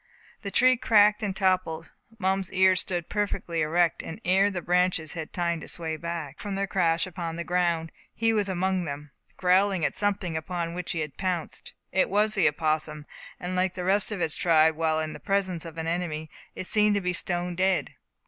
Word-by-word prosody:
The 200 - -4
tree 255 +5 +4
cracked 210 -4 +4
and 200 -3 -2
toppled. 185 -4 0 0.3
Mum's 190 -2 0
ears 185 -1 +4
stood 175 -2 -3
perfectly 200 -5 -2
erect; 165 +2 +2
and 165 - -8
ere 190 +3 +4
the 180 -4 -4
branches 180 -3 +1
had 160 -2 -6
time 170 -2 -1
to - - -9
sway 160 -2 -3
back, 165 -3 -5
from 205 -2 -4
their 200 0 0
crash 170 -4 +1
upon 170 -3 -5
the 170 - -4
ground, 170 -2 0 0.2
he 225 0 +2
was 205 -2 0
among 185 0 0
them, 145 -1 -6 0.3
growling 185 -1 +3
at - - -1
something 200 -5 0
upon 170 +1 -3
which 180 0 -4
he 165 - -2
had 150 -3 -6
pounced. 180 -4 -3 0.2
It 190 - +2
was 210 +2 +2
the 195 -6 +3
opossum; 155 0 -1 0.3
and 180 +1 -4
like 185 0 +1
all - - -21
the 180 - -4
rest 195 +4 +2
of 200 -4 -3
its 155 - 0
tribe 160 -2 +4
when 160 0 +1
in 155 - -5
the - - -9
presence 190 -4 -1
of 165 -1 -9
an 160 - -3
enemy, 165 -2 -3 0.2
it - - -5
seemed 210 +1 +3
to 200 - 0
be 180 -1 -1
stone 175 -1 -2
dead. 185 +1 +1
180 Hz, 205 wpm, -27 LUFS, 165-195 Hz, 0.3 s, tree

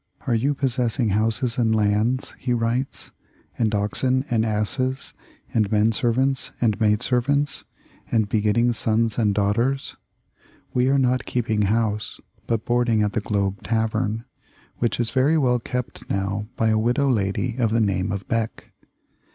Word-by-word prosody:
"Are 125 - +1
you 135 +6 +1
possessing 125 -3 0
houses 115 +4 0
and 110 -2 +2
lands," 110 +5 +1
he 125 -1 -1
writes, 120 +3 -2 0.5
"and 110 -3 +2
oxen 130 +6 0
and 110 -2 +2
asses 130 +5 -1 0.4
and 110 -2 +1
men 110 +1 +3
servants 130 +4 +1
and 115 -2 +1
maid 105 -1 +3
servants, 140 +3 0 0.5
and 110 -3 +2
begetting 110 +3 +2
sons 115 0 0
and 105 -3 +2
daughters? 115 +7 0 0.8
We 125 0 +2
are 140 - +3
not 130 -1 +1
keep 120 -2 -2
ing 105 -1 +2
house, 105 -1 -1 0.3
but 115 -2 -1
boarding 120 -3 +2
at 105 - -1
the 110 - 0
Globe 100 -1 -1
Tavern, 110 0 -1 0.5
which 120 -1 -1
is 120 -1 0
very 140 +5 +3
well 125 -4 +2
kept 125 +1 -5
now 100 +2 -2
by 110 - +1
a 110 0 +2
widow 125 +5 +1
lady 115 +1 0
of 115 -3 +2
the 115 +2 +1
name 100 -4 0
of 100 -1 -4
Beck. 115 -1 -3
115 Hz, 155 wpm, -23 LUFS, 105-125 Hz, 0.8 s, men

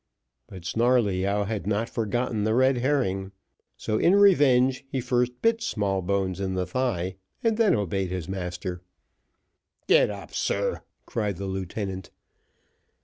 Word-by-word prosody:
But 90 -3 -11
Snarleyyow 105 -4 +2
had 105 -1 -4
not 105 +2 0
forgotten 115 -1 -1
the 110 +1 +1
red 130 0 +3
herring; 110 -8 0 0.5
so 110 - -1
in 180 - +4
revenge, 140 -10 +4
he 135 - -2
first 125 0 0
bit 230 0 +3
Smallbones 95 - -1
in 95 -1 -2
the 90 0 -1
thigh, 95 -8 -2 0.3
and 225 -1 +2
then 225 -2 +3
obeyed 95 -3 -1
his 90 -3 -4
master. 90 -1 -4 1.0
"Get - - +5
up, 100 -1 -8
sir," - - -1 0.2
cried 105 -5 -2
the 100 - -5
lieutenant. 95 0 -4
105 Hz, 135 wpm, -26 LUFS, 95-125 Hz, 1.0 s, Get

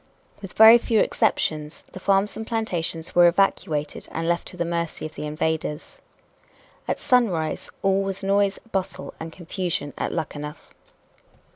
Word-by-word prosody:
With 195 -3 -9
very 225 +2 +9
few 225 -1 +1
exceptions, 150 -4 0
the - - -7
farms 195 +2 +2
and 220 +1 -6
plantations 175 -8 -2
were 175 0 +7
evacuated 165 -5 0
and 165 0 -3
left 170 0 0
to - - -5
the 170 - -1
mercy 170 -2 -3
of 155 - -7
the 150 - -5
invaders. 155 0 -3 0.9
At - - -1
sunrise 185 -12 +1
all 195 0 +3
was 195 0 -4
noise, 200 0 +2
bustle 190 -1 -3
and 160 0 -6
confusion 175 -4 -4
at - - -1
Luckenough. 150 -1 -6
175 Hz, 145 wpm, -24 LUFS, 160-195 Hz, 0.9 s, very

